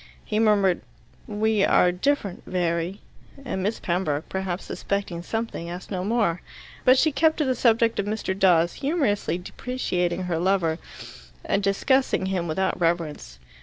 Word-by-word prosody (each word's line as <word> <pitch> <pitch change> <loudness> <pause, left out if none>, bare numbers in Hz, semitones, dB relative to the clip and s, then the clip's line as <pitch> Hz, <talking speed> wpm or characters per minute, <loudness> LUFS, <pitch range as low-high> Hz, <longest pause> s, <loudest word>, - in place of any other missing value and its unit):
He 215 - -1
murmured, 205 -5 +3 0.5
"We 215 -1 +1
are 180 - +4
different, 200 0 -1
very," 175 +1 -1 0.4
and 190 -6 -3
Miss 205 +4 -1
Pembroke, 170 -4 -1
perhaps 190 -1 -3
suspecting 200 -4 -3
something, 225 -4 -4
asked 175 +4 -8
no 185 -2 -2
more. 205 -5 +1 0.4
But 255 +1 +6
she 315 +4 +3
kept 315 +3 +2
to 300 - +1
the 260 - +2
subject 230 -1 +2
of 200 - -1
Mr. 210 -2 -2
Dawes, 175 -3 +3
humorously 270 - 0
depreciating 180 -3 -2
her 175 -3 -1
lover 175 -3 +1 0.7
and 200 - +1
discussing 200 +3 +2
him 185 -3 -1
without 185 +3 -1
reverence. 165 -3 -1
190 Hz, 145 wpm, -25 LUFS, 175-225 Hz, 0.7 s, But